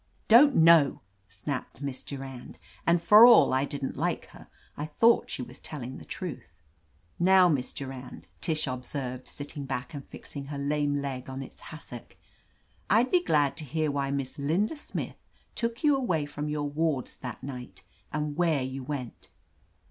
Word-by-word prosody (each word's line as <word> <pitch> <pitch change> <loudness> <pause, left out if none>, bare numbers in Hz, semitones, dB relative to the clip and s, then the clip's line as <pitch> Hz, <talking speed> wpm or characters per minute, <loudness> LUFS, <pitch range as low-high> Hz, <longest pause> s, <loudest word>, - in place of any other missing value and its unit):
"Don't 265 +5 +7
know," 160 -4 +6 0.3
snapped 115 +6 -5
Miss 140 -2 -4
Durand, 135 -3 -8 0.3
and 170 +1 +5
for 210 +6 +8
all 240 - +7
I 130 +1 +2
didn't 140 -2 -4
like - - -1
her, - - -14 0.3
I 150 - -4
thought 230 +10 +3
she 125 - -3
was 125 +1 -10
tell 150 -5 -7
ing 130 +2 -7
the - - -12
truth. - - -7 0.7
"Now, 185 +1 +6
Miss 135 -5 0
Durand," 130 - -8 0.2
Tish 155 -1 +1
observed, 130 -1 -4
sit 145 0 -6
ting 145 -3 -6
back 135 +3 -4
and 140 -2 -6
fixing 140 +1 -9
her 145 0 -6
lame 145 0 0
leg 130 -2 -5
on 135 +1 -5
its - - -13
has 155 - -9
sock, 120 -2 -10 0.7
"I'd 230 +6 +4
be 360 -1 +4
glad 145 - +2
to 160 - -4
hear 155 +1 -1
why 140 -1 -1
Miss 140 0 -3
Linda 175 - 0
Smith 295 - -6 0.3
took 230 +2 -2
you 295 -2 +5
away 180 - 0
from 145 +1 -5
your 150 -1 -1
wards 150 -2 -1
that 125 -3 -7
night, 125 -9 -8 0.3
and 150 -1 -2
where 160 -5 +2
you 130 +1 -5
went." 130 -3 -6
145 Hz, 175 wpm, -28 LUFS, 130-160 Hz, 0.7 s, for